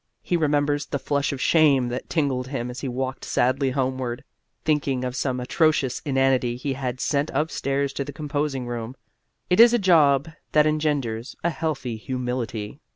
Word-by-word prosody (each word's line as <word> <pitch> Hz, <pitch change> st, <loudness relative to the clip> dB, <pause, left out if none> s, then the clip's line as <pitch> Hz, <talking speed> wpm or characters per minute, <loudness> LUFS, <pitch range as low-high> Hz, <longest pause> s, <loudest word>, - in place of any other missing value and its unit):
He 180 Hz, -, 0 dB
remembers 145 Hz, -2 st, +1 dB
the 140 Hz, -, -2 dB
flush 140 Hz, 0 st, -1 dB
of 140 Hz, -, -5 dB
shame 140 Hz, -7 st, +4 dB
that 125 Hz, +1 st, -5 dB
tingled 135 Hz, -6 st, 0 dB
him 125 Hz, -3 st, -3 dB
as 125 Hz, -, -7 dB
he 135 Hz, -, -4 dB
walked 130 Hz, +1 st, -3 dB
sadly 130 Hz, +2 st, +1 dB
homeward, 130 Hz, -2 st, -2 dB, 0.4 s
thinking 140 Hz, -4 st, +1 dB
of 125 Hz, 0 st, -3 dB
some 130 Hz, -1 st, -1 dB
atrocious 140 Hz, 0 st, +1 dB
inanity 135 Hz, -3 st, +2 dB
he 135 Hz, +2 st, -3 dB
had 130 Hz, -2 st, -4 dB
sent 145 Hz, +2 st, 0 dB
upstairs 140 Hz, -3 st, -1 dB
to 140 Hz, -, -2 dB
the 145 Hz, -, -7 dB
composing 145 Hz, -2 st, -2 dB
room. 120 Hz, +1 st, -5 dB, 0.6 s
It 180 Hz, -, +4 dB
is 235 Hz, +1 st, +8 dB
a -, -, +4 dB
job 155 Hz, -, +4 dB, 0.3 s
that 150 Hz, -1 st, +5 dB
engenders 145 Hz, -7 st, -1 dB
a 170 Hz, -, +2 dB
healthy 155 Hz, -8 st, -3 dB
humility. 125 Hz, -1 st, -4 dB
135 Hz, 165 wpm, -24 LUFS, 125-150 Hz, 0.6 s, is